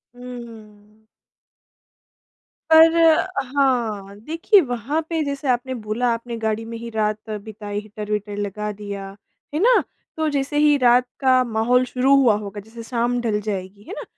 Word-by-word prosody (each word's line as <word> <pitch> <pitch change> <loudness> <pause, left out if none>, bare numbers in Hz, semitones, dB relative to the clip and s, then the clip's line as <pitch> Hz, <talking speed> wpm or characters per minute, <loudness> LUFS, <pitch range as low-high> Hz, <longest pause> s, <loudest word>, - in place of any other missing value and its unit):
हुँ। 220 -4 -12 1.7
पर 320 +1 +8
अ, 330 +2 +4 0.3
हाँ, 220 -8 0
देखिए 330 - +3
वहाँ 265 +7 -1
पे 325 -1 0
जैसे 280 0 -4
आपने 250 +1 0
बोला 225 +1 -2
आपने 230 0 -5
गाड़ी 220 0 -2
में 230 0 -7
ही 235 +1 -7
रात 215 -1 -2
बिताई 210 -1 -5
हीटर-वीटर 210 -1 -5
लगा 210 +1 -3
दिया, 200 -1 -7 0.4
है 305 - -1
ना। 485 +4 +4 0.3
तो 315 0 0
जैसे 285 0 -2
ही 295 0 +5
रात 250 -1 +4
का 255 -1 +4
माहौल 240 +2 +2
शुरू 260 +2 +3
हुआ 250 -6 +5
होगा, 205 0 -7
जैसे 225 +3 -11
शाम 240 +1 -1
ढल 215 -3 0
जाएगी, 200 -1 -5
है - - -9
ना, - - -5
230 Hz, 150 wpm, -22 LUFS, 210-260 Hz, 1.7 s, पर